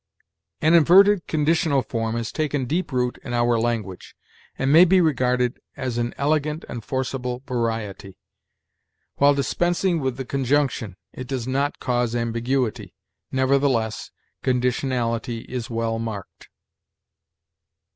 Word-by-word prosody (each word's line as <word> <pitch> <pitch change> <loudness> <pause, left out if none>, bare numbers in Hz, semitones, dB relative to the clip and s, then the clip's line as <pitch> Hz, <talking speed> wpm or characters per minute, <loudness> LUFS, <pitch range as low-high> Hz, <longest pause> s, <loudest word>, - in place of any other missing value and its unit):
"An 160 +2 +5
inverted 185 +4 +6
conditional 155 -3 +1
form 115 -1 -3
has 115 -1 -3
taken 145 -4 -1
deep 165 +6 -2
root 125 -1 -1
in 120 -2 -4
our 120 -1 +2
language, 110 -5 -3 0.4
and 135 +2 +1
may 165 +3 +9
be 185 +1 +5
regarded 125 -6 +1 0.2
as 125 -3 -3
an 120 0 -2
elegant 150 +2 0
and 120 -2 -6
forcible 130 -1 -3
variety. 115 -5 -3 1.0
While 140 0 +5
dispensing 175 +5 0
with 130 -3 -2
the 135 - -5
conjunction, 135 -7 0 0.2
it 130 - -7
does 130 -3 -3
not 140 +2 -1
cause 120 -2 0
ambiguity; 115 +1 -2 0.4
nevertheless, 130 -4 +1 0.3
conditionality 125 -2 -1
is 125 -2 -5
well 115 -1 -2
marked. 110 -4 -7
125 Hz, 120 wpm, -23 LUFS, 115-145 Hz, 1.0 s, may